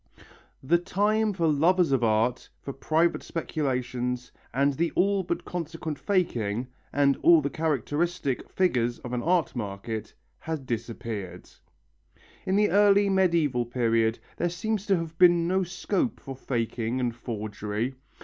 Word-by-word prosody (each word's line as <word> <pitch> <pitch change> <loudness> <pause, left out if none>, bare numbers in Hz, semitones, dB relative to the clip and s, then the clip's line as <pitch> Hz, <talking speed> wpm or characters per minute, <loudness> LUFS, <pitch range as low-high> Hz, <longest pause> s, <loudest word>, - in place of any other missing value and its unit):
The 170 +6 +3
time 210 +4 +1
for 175 -4 -1
lovers 165 +2 +3
of 130 -3 +2
art, 115 +2 +1
for 140 - -5
private 160 +5 +1
speculations 125 -6 -3 0.2
and 140 +3 +2
the 165 +5 0
all 200 +1 +3
but 180 - -3
consequent 160 -3 -5
faking, 120 - 0 0.3
and 140 -1 +3
all 170 -1 +6
the 140 -2 -2
characteristic 155 0 -1
figures 120 -10 +1
of 125 - -8
an 125 - -1
art 170 -3 +1
market 105 0 -5 0.2
had 155 -4 -5
disappeared. 110 -6 -5 1.0
In 190 - +2
the 210 +1 +3
early 200 0 +5
medieval 170 -10 +2
period 115 -2 +1 0.2
there 175 - 0
seems 205 +4 -3
to 195 -2 +3
have 165 -1 -5
been 175 -2 +6
no 190 +2 +2
scope 190 +5 -2
for 135 -2 -8
faking 120 -1 -2
and 120 -2 -1
forgery. 110 0 -4
145 Hz, 140 wpm, -27 LUFS, 120-175 Hz, 1.0 s, all